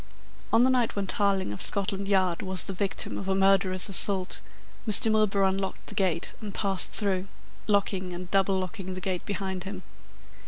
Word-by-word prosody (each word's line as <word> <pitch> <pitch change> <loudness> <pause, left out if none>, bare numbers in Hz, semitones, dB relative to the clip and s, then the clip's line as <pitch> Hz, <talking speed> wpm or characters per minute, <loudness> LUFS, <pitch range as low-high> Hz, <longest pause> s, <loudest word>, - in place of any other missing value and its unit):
On 225 +2 +5
the 260 - +4
night 245 -3 +1
when 200 -1 -1
Tarling 195 - 0
of 105 - -7
Scotland 200 0 0
Yard 185 -3 +1
was 190 -1 +2
the 195 - -4
victim 195 +1 -2
of 195 - -6
a 190 - +1
murderous 190 -1 +3
assault, 195 -1 +2 0.5
Mr. 215 +1 +4
Milburgh 210 -2 +2
unlocked 195 0 -4
the - - -6
gate 180 -4 -1
and 205 -3 -7
passed 195 -2 +1
through, 195 -3 -1 0.4
locking 195 -3 0
and 180 0 -7
double 195 0 +2
locking 185 0 -5
the - - -5
gate 185 -1 -4
behind 190 -2 -3
him. 190 -1 -7
195 Hz, 180 wpm, -27 LUFS, 185-200 Hz, 0.5 s, On